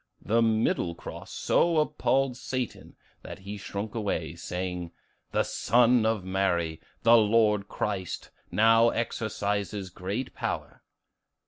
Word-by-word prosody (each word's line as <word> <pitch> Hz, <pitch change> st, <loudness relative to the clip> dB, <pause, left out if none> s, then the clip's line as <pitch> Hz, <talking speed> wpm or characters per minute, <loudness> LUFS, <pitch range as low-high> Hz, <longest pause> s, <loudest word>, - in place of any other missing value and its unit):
The 115 Hz, +4 st, +2 dB
middle 110 Hz, -6 st, +1 dB
cross -, -, -9 dB
so 170 Hz, -1 st, +2 dB
appalled 135 Hz, -4 st, +1 dB
Satan 130 Hz, -1 st, -5 dB, 0.3 s
that -, -, -8 dB
he 100 Hz, +2 st, -7 dB
shrunk 100 Hz, +1 st, -5 dB
away, 105 Hz, -4 st, -2 dB
saying, 90 Hz, -1 st, -4 dB, 0.4 s
'The -, -, +2 dB
Son 120 Hz, +1 st, +3 dB
of 110 Hz, -4 st, 0 dB
Mary, 90 Hz, -4 st, 0 dB, 0.2 s
the 115 Hz, +1 st, +7 dB
Lord 105 Hz, -2 st, +3 dB
Christ, 95 Hz, -5 st, -3 dB, 0.2 s
now 115 Hz, +2 st, +5 dB
exercises 105 Hz, -4 st, -2 dB
great 100 Hz, +8 st, -4 dB
power. -, -, -4 dB
105 Hz, 115 wpm, -28 LUFS, 95-115 Hz, 0.4 s, the